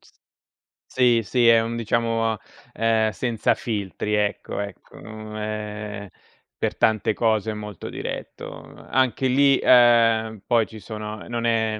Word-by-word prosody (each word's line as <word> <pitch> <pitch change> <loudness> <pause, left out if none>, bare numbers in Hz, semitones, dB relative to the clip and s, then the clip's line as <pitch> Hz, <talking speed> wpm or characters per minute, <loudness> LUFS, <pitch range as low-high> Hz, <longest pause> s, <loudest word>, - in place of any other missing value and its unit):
S - - -23 0.8
Sì, 120 -3 +3
sì, 120 +2 +2
è 115 -1 +6
un 115 +1 -3
diciamo, 115 -1 0 0.4
ehm, 110 -1 +2
senza 115 +2 0
filtri 105 -1 -3
ecco 105 -1 -2
ecco, 100 -1 -8
mhmm, 110 0 -9
ehm, 105 -1 -5 0.5
per - - -2
tante 110 -1 +2
cose 110 -1 0
molto 105 -3 -7
diretto. - - -6 0.4
Anche 130 0 +1
lì, 135 +1 +4
uhm, 115 -3 +5
poi 115 -3 +2
ci 110 -1 -11
sono 105 -1 -7
non 120 -1 -2
è 110 -2 +1
110 Hz, 130 wpm, -23 LUFS, 105-115 Hz, 0.8 s, è